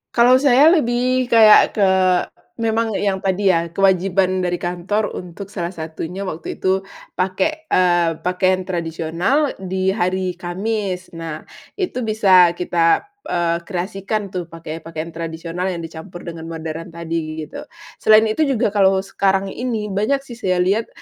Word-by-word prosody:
Kalau 245 +2 +6
saya 280 +3 +6
lebih 255 -4 +1
kayak 220 -3 +6
ke 200 -3 +3 0.7
memang 225 -1 0
yang 195 -1 0
tadi 190 +1 +2
ya 170 -1 0
kewajiban 190 -1 +2
dari 180 -1 0
kantor 180 +5 -2
untuk 185 +3 -8
salah 175 -2 -4
satunya 165 +4 -6
waktu 165 -3 -5
itu 190 +1 -1 0.3
pakai, 310 - -1
eee, 175 -2 +3
pakaian 185 +1 +1
tradisional 175 - -1
di 190 0 -1
hari 185 -2 -1
Kamis. 190 +1 -3
Nah, 165 -2 -7 0.3
itu 360 -10 -3
bisa 185 -5 +5
kita, 170 -2 +2 0.2
eee, 170 -1 0
kreasikan 195 +2 -3
tuh 180 -2 -4
pake 165 -1 -8
pakaian 165 0 -7
tradisional 165 +2 -4
yang 175 -3 -3
dicampur 165 +2 -9
dengan 165 -1 -7
modern 165 0 -6
tadi, 160 -2 -4
gitu. 150 - -9 0.3
Selain 220 0 +6
itu 225 +8 +1
juga 240 -5 +1
kalau 195 -2 +3
sekarang 195 0 0
ini 225 -5 -3
banyak 230 +8 0
sih 240 -3 -11
saya 185 -5 +1
lihat, 205 +5 +1
185 Hz, 145 wpm, -20 LUFS, 170-215 Hz, 0.7 s, Kalau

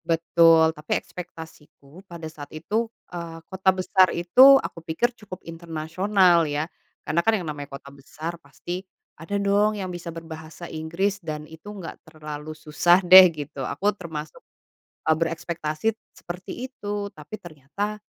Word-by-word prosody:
Betul, 165 -1 +5
tapi 150 -1 -2
ekspektasiku 160 -2 -11
pada 170 -2 -8
saat 155 -2 -9
itu, 210 +9 -2 0.2
eee, 170 -1 -6
kota 190 0 +1
besar 185 0 +4
itu 255 +11 +7
aku 165 - -5
pikir 165 +10 -1
cukup 210 -6 -11
internasional 170 +2 +2
ya 145 +1 -1 0.4
karena 155 +3 +1
kan 225 - +3
yang 180 - -5
namanya 145 -1 -6
kota 140 - -14
besar 155 +5 -7
pasti 175 +6 -6 0.4
ada 200 +5 -2
dong 205 +2 +3
yang 190 -2 -4
bisa 175 0 -6
berbahasa 160 0 -9
Inggris 170 +6 -1
dan 155 -2 -5
itu 160 +5 -12
enggak 190 -5 -8
terlalu 155 -1 -8
susah 160 +3 +3
deh 185 +1 +11
gitu. 150 -3 -7
Aku 200 +10 0
termasuk, 160 -5 -8 0.7
eee, 160 - +5
berekspektasi 165 +4 -2 0.2
seperti 185 +8 -7
itu, 205 -5 -4
tapi 155 +8 -9
ternyata 175 +7 -5
170 Hz, 145 wpm, -24 LUFS, 155-190 Hz, 0.7 s, deh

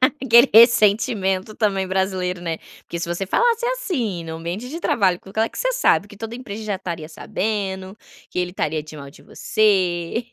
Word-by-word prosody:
aquele 260 -2 +5
ressentimento 215 -3 +4
também 195 -3 0
brasileiro, 185 -1 -1
né. 165 -2 -3 0.2
Porque 170 - -6
se 170 - -3
você 175 +3 -3
falasse 475 - +2
assim 315 - -2
no 160 0 -6
ambiente 175 +9 -5
de 320 +5 -5
trabalho, 190 - +2
com 195 - -14
aquela 220 +3 0
que - - -10
você - - 0
sabe 205 - +2
que 205 - -13
toda 225 +2 -6
a - - -7
empresa 220 -3 -7
já 205 -2 -2
estaria 170 -5 -6
sabendo, 190 +2 -3 0.3
que - - -5
ele 180 0 -1
estaria 155 -4 -2
de 155 +1 -11
mal 140 -1 -9
de - - -18
você. 190 0 0
195 Hz, 190 wpm, -21 LUFS, 175-230 Hz, 0.3 s, aquele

